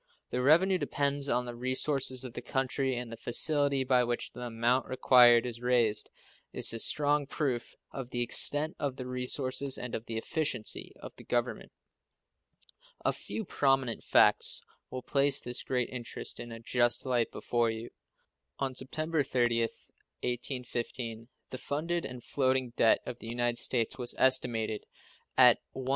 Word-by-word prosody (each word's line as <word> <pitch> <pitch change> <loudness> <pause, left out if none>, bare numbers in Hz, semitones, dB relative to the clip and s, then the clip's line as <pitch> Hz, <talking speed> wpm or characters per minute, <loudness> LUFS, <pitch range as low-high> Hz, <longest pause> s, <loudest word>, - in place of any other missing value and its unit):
The 125 - -1
revenue 175 +7 +4
depends 140 -2 -1
on 125 +1 +1
the 120 - -6
resources 130 +1 -1
of 125 -3 -7
the 120 - -6
country, 130 +1 -1
and 120 -1 -5
the - - -6
facility 140 +2 +2
by 125 -1 +3
which 120 0 -3
the 125 - -10
amount 120 +2 0
required 125 -2 +6
is 120 -1 -6
raised 120 -4 +1 0.4
is - - +3
a 115 - -3
strong 145 +2 +1
proof 135 -5 -3 0.2
of 130 -3 -7
the 120 -1 0
extent 145 +6 +3
of 140 -3 -2
the 130 - -7
resources 130 +2 -1
and 125 - -6
of 115 - -5
the 115 - -4
efficiency 125 -3 -1
of - - -10
the - - -11
Government. 120 0 -2 1.3
A - - +3
few 220 - -6
prominent 135 -7 0
facts - - +3 0.3
will 130 -1 -6
place 140 +1 +2
this 125 +1 -3
great 125 -2 -1
interest 120 -2 -5
in 120 - -8
a 115 - -8
just 120 +1 +1
light 120 -3 0
before 120 -1 0
you. 110 +1 -6 0.7
On 135 -1 -2
September 155 +5 -2
30th, 120 -3 0 0.4
1815, 120 -2 -4 0.2
the 130 - -6
funded 165 +5 -2
and 125 -2 -8
floating 130 -2 0
debt 110 - +4
of 120 -1 -7
the - - -9
United 120 0 -1
States 120 0 -1
was 120 -1 -1
estimated 120 -5 +2 0.5
at - - +7 0.2
$119,635,558. 130 -1 -6
125 Hz, 155 wpm, -30 LUFS, 120-135 Hz, 1.3 s, at